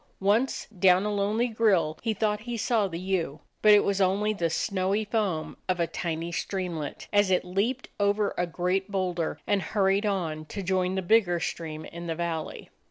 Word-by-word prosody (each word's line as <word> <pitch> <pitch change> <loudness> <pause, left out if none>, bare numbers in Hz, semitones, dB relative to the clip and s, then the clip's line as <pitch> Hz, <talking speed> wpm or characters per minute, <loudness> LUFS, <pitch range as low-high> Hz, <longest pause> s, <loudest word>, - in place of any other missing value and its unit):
Once, 210 +7 +1
down 185 +1 +5
a 210 - -1
lonely 210 +4 +1
grill, 200 -9 +2
he 225 - 0
thought 210 0 0
he 235 +2 -5
saw 220 -1 +1
the 165 -3 -5
ewe, 180 -5 -2 0.2
hut 215 - +8
it 205 -1 +7
was 200 0 0
only 200 +3 +2
the 170 -5 -1
snowy 195 +4 0
foam 200 -7 -1
of 180 -1 +1
a 170 - +3
tiny 165 0 -3
streamlet, 170 -5 -4
as 205 -1 +4
it 185 -1 +2
leaped 210 +8 -1
over 205 0 +2
a 175 - 0
great 180 +3 -1
boulder 180 -4 -2
and 205 -1 +1
hurried 195 +2 +1
on 165 -6 -2
to 200 +5 -6
join 185 0 0
the 190 - -1
bigger 180 -3 +3
stream 155 -2 -4
in 170 0 -8
the 165 - -2
valley. 165 -2 -4
190 Hz, 185 wpm, -27 LUFS, 170-210 Hz, 0.2 s, hut